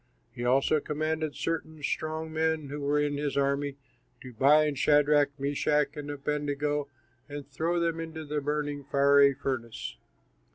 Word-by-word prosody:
He 120 0 -6
also 135 +5 +3
commanded 155 +1 -2
certain 160 -2 -4
strong 155 +1 -3
men 160 -2 0
who 145 +1 -5
were 145 +1 +1
in 145 -1 0
his 145 -1 -2
army 140 0 0 0.4
to 130 -1 -10
bind 145 +3 +4
Shadrach, 145 -1 +3
Meshach, 145 +1 +1
and 145 -1 -6
Abednego, 145 0 -2 0.4
and 145 -1 -7
throw 165 +5 -1
them 165 -1 0
into 160 -1 -6
the 150 0 -2
burning, 145 0 -2
fiery 140 0 +4
furnace. 125 -4 -4
145 Hz, 140 wpm, -28 LUFS, 140-155 Hz, 0.4 s, bind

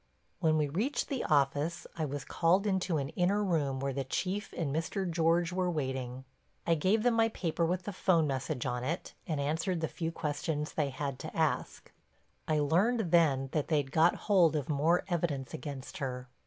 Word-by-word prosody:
When 160 -2 +3
we 150 -1 +2
reached 210 - -1
the 270 -3 -1
office 145 +3 +1
I 160 - -1
was 145 -1 -5
called 180 +4 +2
into 190 -4 +1
an 140 -1 -2
inner 195 +6 +1
room 150 -8 0
where 135 0 -2
the 135 +1 -2
Chief 190 - -2
and 150 -4 -1
Mr. 180 +4 -1
George 170 +1 +2
were 180 -1 +1
waiting. 130 -4 -3 0.4
I 170 - +3
gave 190 +7 +2
them 245 -1 +4
my 225 0 +3
paper 170 -5 -2
with 180 +2 -1
the 205 - -5
'phone 175 -3 +3
message 135 -1 -2
on 125 -1 -2
it, 165 +7 -3
and 155 -4 -1
answered 160 +5 -1
the 160 - -1
few 165 0 -3
questions 150 -1 -3
they 150 -3 0
had 140 0 -4
to - - -7
ask. - - -1 0.6
I 155 - +2
learned 180 +7 +2
then 140 -6 +3
that 150 -3 -1
they'd 145 -4 0
got 165 +3 +4
hold 180 -6 +4
of 145 -1 -2
more 155 +4 +2
evidence 155 -7 -2
against 135 0 -6
her. 125 -2 -4
160 Hz, 190 wpm, -31 LUFS, 140-180 Hz, 0.6 s, them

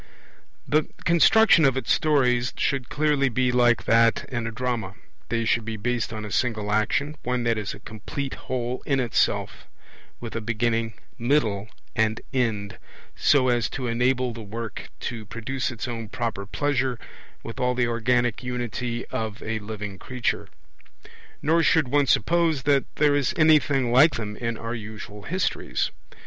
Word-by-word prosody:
The 155 0 +2 0.2
construction 170 +2 +6
of 135 -2 +4
its 130 - -1
stories 125 -5 +2
should 135 -4 -1
clearly 145 -2 +2
be 125 +1 +1
like 120 -1 +3
that 115 0 +3
in 120 -3 -3
a - - -3
drama; 115 -5 -3 0.3
they 115 -1 0
should 115 0 +2
be 110 0 -4
based 120 +2 -1
on 110 -1 -5
a 105 - -7
single 110 -4 0
action, 140 +8 +1
one 125 0 -1
that 115 -1 +2
is 105 -2 -4
a - - -13
complete 130 +6 -6 0.2
whole 125 -1 -2
in 135 -2 +2
itself, 120 -3 0 0.5
with 115 -2 -7
a 115 - -2
beginning, 115 0 -1 0.2
middle, 115 -5 +1 0.3
and 110 0 +1
end, 110 -6 -1 0.4
so 130 -3 +4
as 120 -2 +1
to 130 - -4
enable 125 +1 +1
the 115 - -8
work 110 +1 -6
to 115 -3 -4
produce 115 +5 -3
its 120 -1 -5
own 115 -3 -5
proper 110 -4 -3
pleasure 130 0 0 0.5
with 115 - -7
all 125 0 +1
the 125 -1 +2
organic 120 0 +1
unity 120 -1 -3
of 110 -4 -4
a 110 0 -2
living 105 -2 -7
creature. 125 0 -2 1.0
Nor 165 +3 +3
should 160 -3 +3
one 145 +1 +3
suppose 160 +3 +2
that 140 -1 +3
there 150 -1 +3
is 145 -2 +1
anything 145 -5 +4
like 145 +6 +6
them 105 -2 -4
in 115 0 -3
our 115 +1 -4
usual 110 -2 -8
histories. 185 - -1
120 Hz, 160 wpm, -25 LUFS, 110-135 Hz, 1.0 s, construction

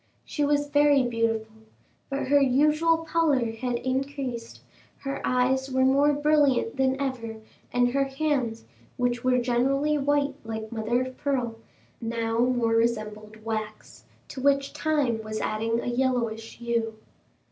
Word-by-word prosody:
She 295 - -2
was 290 0 +2
very 290 -2 +4
beautiful, 225 -2 -1 0.5
but 275 0 -2
her 285 0 +5
usual 305 +5 +3
pallor 290 -9 +2
had 245 +2 -3
increased; 260 -2 -3 0.4
her 275 0 -4
eyes 260 +1 +1
were 260 0 +3
more 280 +3 +4
brilliant 290 -5 +2
than 265 0 +1
ever, 250 -5 -3 0.4
and 245 0 +3
her 275 +2 +1
hands, 270 -5 -1 0.3
which 245 -1 0
were 255 0 +3
generally 270 +5 +1
white 285 0 +1
like 220 -1 -5
mother 235 +2 0
of 255 0 -7
pearl, 250 -5 -1 0.4
now 230 0 -1
more 240 -2 +2
resembled 215 -1 -1
wax, 215 -1 -5 0.2
to 260 - -7
which 275 0 +2
time 285 -8 0
was 215 0 -5
adding 225 +2 -1
a - - -5
yellowish 240 -3 -1
hue. 230 -2 -1
255 Hz, 135 wpm, -26 LUFS, 230-280 Hz, 0.5 s, her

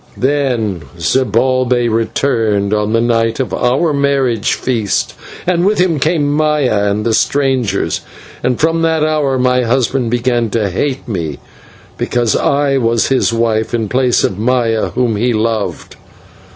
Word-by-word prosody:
"Then 125 - 0 0.2
Zibalbay 130 -1 +1
returned 110 -3 0
on 105 0 0
the 115 - +2
night 115 0 0
of 130 - -2
our 135 +6 +1
marriage 135 -6 +1
feast, 115 -6 -1 0.3
and 175 -1 +1
with 205 +3 +2
him 180 -4 +1
came 155 0 +1
Maya 145 -9 +1
and 105 +1 -2
the 115 - +1
strangers; 130 0 0 0.4
and 125 -1 -1
from 165 +1 +1
that 160 -1 +1
hour 150 -4 +1
my 125 0 +2
husband 125 0 0
began 120 -1 0
to 105 -2 -1
hate 135 +8 -2
me 85 - -3 0.6
because 120 -2 0
I 140 -1 +1
was 115 -2 +1
his 130 -3 +2
wife 115 -1 0
in 110 -3 -2
place 125 0 +2
of 95 - -1
Maya, 115 -1 +1
whom 120 -4 -1
he 120 +3 +1
loved. 110 -1 -2
125 Hz, 145 wpm, -15 LUFS, 115-140 Hz, 0.6 s, the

